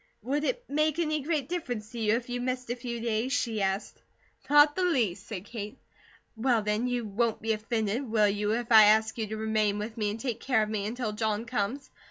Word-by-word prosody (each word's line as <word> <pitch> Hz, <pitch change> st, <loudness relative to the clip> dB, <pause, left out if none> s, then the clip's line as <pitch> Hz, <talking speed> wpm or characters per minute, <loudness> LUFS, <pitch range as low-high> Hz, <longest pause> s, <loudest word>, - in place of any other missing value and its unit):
"Would 285 Hz, +5 st, -1 dB
it 485 Hz, +8 st, -1 dB
make 305 Hz, +1 st, +1 dB
any 310 Hz, -3 st, 0 dB
great 295 Hz, -2 st, -1 dB
difference 245 Hz, -11 st, -4 dB
to 240 Hz, -, -6 dB
you 215 Hz, 0 st, +2 dB
if 235 Hz, 0 st, -3 dB
you 245 Hz, 0 st, -3 dB
missed 250 Hz, -1 st, -2 dB
a -, -, -1 dB
few 240 Hz, -1 st, -5 dB
days?" 230 Hz, +2 st, -1 dB
she 225 Hz, -4 st, 0 dB
asked. 195 Hz, +1 st, -2 dB, 0.5 s
"Not 295 Hz, +1 st, +6 dB
the 375 Hz, -, -1 dB
least," 245 Hz, -, 0 dB
said 200 Hz, -4 st, -6 dB
Kate. 215 Hz, +2 st, -7 dB, 0.6 s
"Well, 230 Hz, -1 st, +1 dB
then, 210 Hz, +4 st, 0 dB
you 245 Hz, -2 st, -1 dB
won't 220 Hz, +2 st, 0 dB
be 225 Hz, +1 st, 0 dB
offended, 220 Hz, +3 st, -2 dB
will 215 Hz, -2 st, +4 dB
you, 205 Hz, +1 st, 0 dB
if 240 Hz, +1 st, -3 dB
I 220 Hz, -2 st, +9 dB
ask 220 Hz, +2 st, +3 dB
you 220 Hz, -, -1 dB
to 215 Hz, +1 st, -5 dB
remain 215 Hz, -1 st, +1 dB
with 215 Hz, +2 st, -5 dB
me 210 Hz, -2 st, 0 dB
and 210 Hz, +2 st, -4 dB
take 235 Hz, -1 st, -3 dB
care 250 Hz, -5 st, +2 dB
of 210 Hz, -, -4 dB
me 210 Hz, -2 st, -2 dB
until 230 Hz, -1 st, -3 dB
John 215 Hz, 0 st, -1 dB
comes? 240 Hz, +3 st, -3 dB
230 Hz, 225 wpm, -28 LUFS, 215-255 Hz, 0.6 s, I